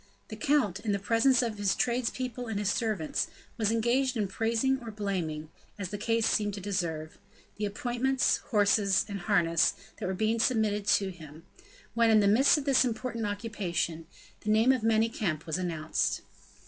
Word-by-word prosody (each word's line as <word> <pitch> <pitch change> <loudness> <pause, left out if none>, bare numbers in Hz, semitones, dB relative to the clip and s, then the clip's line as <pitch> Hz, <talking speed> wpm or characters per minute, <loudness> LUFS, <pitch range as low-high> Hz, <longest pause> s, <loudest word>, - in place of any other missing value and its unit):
The - - -6
count, 265 -11 +1
in 210 -3 -1
the - - +1
presence 235 +5 +3
of 220 -3 -3
his 200 -1 +1
tradespeople 250 0 -2
and 220 -2 -2
of 205 - -3
his 205 - +2
servants, 215 -9 -1 0.3
was 220 -3 0
engaged 240 +3 +1
in 210 -2 0
praising 230 +6 0
or 235 - -7
blaming, 175 -7 -3 0.3
as 195 -3 -4
the 205 - -4
case 230 +1 +1
seemed 205 -1 +1
to - - -6
deserve, 170 -5 -3 0.4
the 210 0 -1
appointments, 245 +5 0
horses, 205 -2 +2
and 200 -2 -5
harness 170 -4 +2 0.2
that - - -3
were 190 - -2
being 220 +3 0
submitted 215 -4 +1
to 195 -2 +2
him; 160 -2 -12 0.5
when, 230 0 +3
in 220 -1 +6
the 200 - +3
midst 250 +9 +5
of 290 - -4
this 275 -2 +4
important 235 -2 -3
occupation, 190 -6 -3 0.3
the 215 - -5
name 220 +4 +5
of 260 -3 +1
Manicamp 220 -7 0
was 165 +2 -2
announced. 165 -3 -1
215 Hz, 175 wpm, -29 LUFS, 190-235 Hz, 0.5 s, in